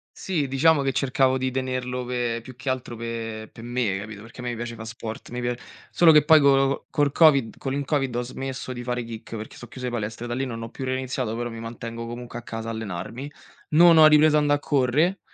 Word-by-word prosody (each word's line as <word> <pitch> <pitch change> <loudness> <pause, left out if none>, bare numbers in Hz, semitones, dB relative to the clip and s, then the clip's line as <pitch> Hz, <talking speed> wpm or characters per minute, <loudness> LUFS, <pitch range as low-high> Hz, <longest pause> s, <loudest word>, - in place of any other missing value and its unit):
Sì 165 -7 -1
diciamo 140 +3 +3
che 135 -1 +1
cercavo 130 0 +2
di 130 0 -1
tenerlo 130 -1 -2
pe 120 -2 -2
più 130 -1 -11
che 125 +2 -5
altro 130 -2 -3
pe 115 -1 -5
per - - -11
me 120 -4 -1
capito, 105 0 -8
perché 115 +2 -11
a - - -8
me 120 -1 -3
piace 115 0 -5
fa 110 - -8
sport. 115 -1 -7
Mi 125 +1 -5
pia 120 0 -1 0.4
solo 170 -2 +6
che 150 -2 +6
poi 160 0 +8
colo 135 -1 +5
co 140 - -3
col 145 -1 +1
Covid 140 -7 +4
con 135 -1 -3
il 140 0 -2
Covid 135 -4 0
ho 120 - 0
smesso 130 +1 -5
di 120 - -6
fare 125 0 -2
kick 115 0 -8
perché 110 - -8
so' 120 - -10
chiuse 125 +1 -5
palestre 115 0 -4
e - - -5
da 120 - -3
lì 135 +2 -1
non 115 -2 -5
ho 115 - -6
più 130 - -8
reiniziato, 130 -3 -2
però 120 0 -3
mi 115 -1 -8
mantengo 115 0 -6
comunque 120 0 -7
a - - -11
casa 115 0 -6
allenarmi. 115 +5 -5 0.4
Non 165 +2 +7
ho 155 -1 +9
ripreso 150 0 +6
andare 145 -1 +2
correre, 145 +7 +1
125 Hz, 235 wpm, -24 LUFS, 115-135 Hz, 0.4 s, ho